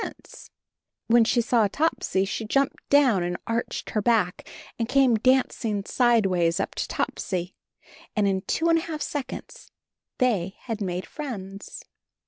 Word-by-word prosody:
When 235 0 +5
she 240 +1 +2
saw 230 -2 +3
Topsy 200 -6 0
she 205 - -3
jumped 275 +5 -1
down 265 -9 +5
and 175 0 -2
arched 230 +1 -3
her 215 - 0
back 205 -5 +1 0.3
and 230 0 -1
came 265 -2 +4
dancing 225 -3 +1
sideways 195 -9 +2
up - - -2
to - - -3
Topsy 180 -1 -3 0.3
— - - -23
and 210 -2 +2
in 190 -1 +1
two 325 - -1
and 330 0 +4
a 325 - -7
half 305 -2 -3
seconds 295 - -6 0.5
they 200 -8 +1
had 225 -3 -5
made 180 -1 -2
friends. 200 -9 -7
225 Hz, 145 wpm, -25 LUFS, 195-260 Hz, 0.5 s, When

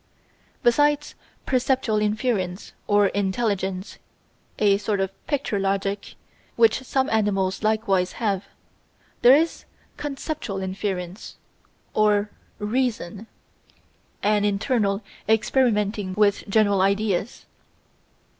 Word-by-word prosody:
Besides 290 +4 +3 0.3
perceptual 255 -4 +1
inference 210 -4 -1
or 205 -1 +4
Intelligence 195 -1 -2 0.6
a 200 -2 +3
sort 210 -1 -1
of 195 0 -1 0.2
picture 275 -8 -1
logic, 195 +1 -2 0.4
which 455 - +4
some 260 0 0
animals 195 -3 +1
likewise 215 -4 +1
have 200 -4 -1 0.8
there 250 +2 +8
is 325 +3 0 0.3
conceptual 290 -6 -4
inference 190 0 -4 0.6
or 210 -1 +2 0.3
Reason 220 -3 -2 1.0
an 210 0 +2
internal 205 0 0 0.3
experimenting 210 -4 +1
with 205 -1 +2
general 205 -2 +3
ideas. 200 +1 0
210 Hz, 90 wpm, -24 LUFS, 195-230 Hz, 1.0 s, there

